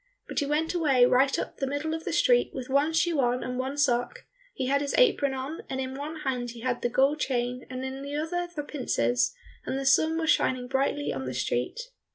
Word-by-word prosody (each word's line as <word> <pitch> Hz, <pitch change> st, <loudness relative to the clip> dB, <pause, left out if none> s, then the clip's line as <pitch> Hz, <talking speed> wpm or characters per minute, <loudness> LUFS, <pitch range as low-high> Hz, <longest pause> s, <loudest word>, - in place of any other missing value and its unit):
But -, -, -2 dB
he 285 Hz, -, -1 dB
went 310 Hz, +4 st, 0 dB
away 280 Hz, -8 st, +4 dB
right 265 Hz, +2 st, +3 dB
up -, -, -4 dB
the 270 Hz, -, -2 dB
middle 285 Hz, +3 st, -2 dB
of 325 Hz, 0 st, -5 dB
the -, -, -2 dB
street -, -, +3 dB
with 255 Hz, -1 st, -5 dB
one 285 Hz, +3 st, +3 dB
shoe 330 Hz, -1 st, +1 dB
on 245 Hz, -1 st, +1 dB
and 250 Hz, 0 st, -4 dB
one 265 Hz, +2 st, -3 dB
sock; 245 Hz, -4 st, 0 dB, 0.3 s
he 260 Hz, -, -2 dB
had 280 Hz, +2 st, +2 dB
his 285 Hz, -, -1 dB
apron 295 Hz, -, +3 dB
on, 270 Hz, +5 st, -5 dB
and 265 Hz, -, -3 dB
in 260 Hz, 0 st, -3 dB
one 300 Hz, +3 st, -6 dB
hand 250 Hz, -4 st, -2 dB
he 235 Hz, -1 st, -9 dB
had 250 Hz, 0 st, -1 dB
the 240 Hz, -, 0 dB
gold 275 Hz, +5 st, +2 dB
chain 250 Hz, -2 st, -2 dB
and 255 Hz, 0 st, -5 dB
in 265 Hz, +1 st, -5 dB
the 280 Hz, +1 st, -5 dB
other 350 Hz, +4 st, -2 dB
the 295 Hz, -, -3 dB
pincers, 250 Hz, -3 st, 0 dB, 0.3 s
and 265 Hz, -, -3 dB
the 270 Hz, -, -3 dB
sun 315 Hz, +4 st, +4 dB
was 320 Hz, -1 st, +2 dB
shining 250 Hz, -1 st, +1 dB
brightly 275 Hz, +2 st, 0 dB
on 135 Hz, 0 st, -4 dB
the 130 Hz, -1 st, -4 dB
street. 125 Hz, -, -1 dB
270 Hz, 230 wpm, -27 LUFS, 250-300 Hz, 0.3 s, away